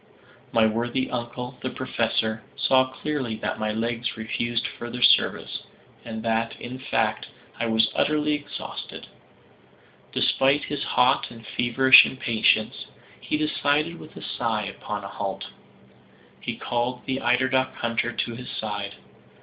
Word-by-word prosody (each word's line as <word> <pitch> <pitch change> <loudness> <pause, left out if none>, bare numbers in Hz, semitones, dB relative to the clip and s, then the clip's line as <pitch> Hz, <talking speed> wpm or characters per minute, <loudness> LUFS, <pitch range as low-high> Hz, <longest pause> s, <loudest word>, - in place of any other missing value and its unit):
My 115 -1 +4
worthy 120 +4 0
uncle, 125 +1 -5
the 130 - -2
Professor, 115 -3 -1
saw 130 0 +3
clearly 130 -3 -3
that - - -3
my 110 0 0
legs 115 +2 -2
refused 115 +1 -2
further 120 +1 -4
service, - - +3 0.4
and 110 -1 -6
that, 115 0 0
in 125 +2 -7
fact, 130 - 0 0.3
I 115 - 0
was 110 0 +3
utterly 150 0 +2
exhausted. 145 -1 -6 1.1
Despite 135 +2 +3
his 145 -1 -3
hot 125 +2 +3
and 115 -1 -12
feverish 130 +3 +7
impatience, 115 -4 +1 0.3
he - - -1
decided, 150 +2 0
with 155 - -12
a - - -8
sigh, 110 -3 -1
upon 105 +1 -5
a - - -5
halt. 100 -1 -4 0.9
He - - -4
called 120 +1 -2
the 130 0 -2
eider 125 +2 +3
duck 130 0 +1
hunter 115 0 -1
to 120 - -2
his 125 +1 -8
side. 100 -2 -4
120 Hz, 135 wpm, -25 LUFS, 115-130 Hz, 1.1 s, feverish